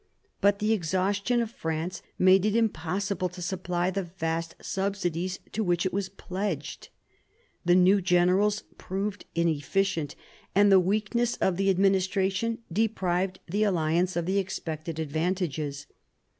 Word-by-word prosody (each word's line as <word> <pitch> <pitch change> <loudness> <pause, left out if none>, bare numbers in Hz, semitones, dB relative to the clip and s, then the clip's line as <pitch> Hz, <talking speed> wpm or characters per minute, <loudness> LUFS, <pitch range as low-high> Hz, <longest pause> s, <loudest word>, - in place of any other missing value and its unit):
But 200 0 +4
the 210 +2 +1
exhaustion 200 +5 +1
of 225 - -6
France 160 -3 -3 0.2
made 185 0 +5
it 215 0 +1
impossible 195 -2 0
to 180 - -11
supply 180 0 -1
the 195 +1 -1 0.2
vast 165 0 -2
subsidies 185 -2 -2
to 220 - -1
which 175 -2 +1
it 185 - -1
was 195 0 -1
pledged; 185 -6 -4 0.8
the 175 0 +5
new 185 +2 +5
generals 185 +4 +3 0.2
proved 195 +2 -3
inefficient; 170 +1 0 0.4
and 205 0 +6
the 190 - +8
weakness 215 +6 0
of 190 - +1
the 195 +2 +1
administration 195 +3 +1
deprived 190 -3 0
the 200 +5 -1
alliance 175 -2 +1
of 170 -1 -1
the 190 +3 +1
expected 165 -4 -4
advantages. 155 -2 -2
185 Hz, 130 wpm, -27 LUFS, 175-200 Hz, 0.8 s, the